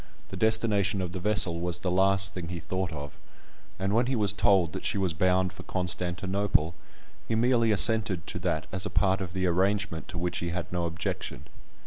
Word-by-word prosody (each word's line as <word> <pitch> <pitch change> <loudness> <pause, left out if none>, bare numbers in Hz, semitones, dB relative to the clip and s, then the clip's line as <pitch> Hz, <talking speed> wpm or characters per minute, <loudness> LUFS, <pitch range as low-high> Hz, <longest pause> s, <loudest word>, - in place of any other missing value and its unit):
The - - -7
destination 110 -3 +3
of 90 -2 -3
the 95 - -5
vessel 95 -4 +3
was 85 0 0
the 90 +1 -2
last 95 +1 +3
thing 90 -2 -5
he 85 0 -5
thought 95 +1 -3
of; 70 -2 -8 0.6
and 95 +1 -1
when 120 +3 +2
he 130 - 0
was 105 -3 +2
told 95 -5 +3
that - - -5
she - - -1
was 95 -3 0
bound 90 +2 +1
for - - -10
Constantinople, 90 -1 -1 0.5
he 115 - 0
merely 115 -1 +3
assented 105 -5 +3
to - - -5
that - - -1
as 95 0 +1
a - - -1
part 95 -1 +1
of 90 -2 -5
the 95 -1 -1
arrangement 95 0 0
to 85 - -7
which 90 +1 -2
he 85 - -3
had 90 +1 -4
no 85 -1 -1
objection. 85 0 -4
95 Hz, 200 wpm, -28 LUFS, 85-100 Hz, 0.6 s, destination